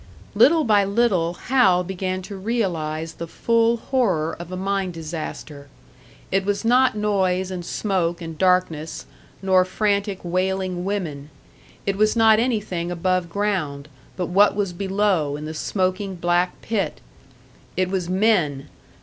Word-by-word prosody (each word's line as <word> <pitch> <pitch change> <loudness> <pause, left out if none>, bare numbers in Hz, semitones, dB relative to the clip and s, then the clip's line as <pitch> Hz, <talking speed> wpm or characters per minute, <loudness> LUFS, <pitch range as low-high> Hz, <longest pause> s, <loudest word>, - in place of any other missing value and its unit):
Little 320 +1 +5
by 210 -4 +4
little 195 -5 +1
Hal 190 -9 +4
began 185 0 -3
to 200 +2 -8
realise 170 -7 -2
the 170 - -7
full 230 +5 +2
horror 195 - 0
of 170 +1 -8
a 185 - -4
mine 195 0 -1
disaster. 155 -3 -7 0.6
It 195 0 +2
was 205 +2 -2
not 250 0 +4
noise 190 -3 0
and 180 -1 -5
smoke 175 -3 -1
and 165 -2 -7
darkness, 180 -3 0 0.4
nor 185 -1 +4
frantic, 200 +1 0
wailing 185 0 -1
women; 160 -8 -3 0.6
it 195 -1 -1
was 215 +2 +3
not 220 -1 +5
anything 210 -8 -1
above 180 0 0
ground, 170 -8 -2 0.3
but 180 - -1
what 200 +4 +4
was 200 -3 -1
below 190 -5 0
in 150 - -7
the 155 - -5
smoking 185 +3 -1
black 175 +1 0
pit! 200 -8 -2 0.8
It 185 0 +1
was 180 -3 -2
men! 185 -9 +1
185 Hz, 140 wpm, -22 LUFS, 170-205 Hz, 0.8 s, Little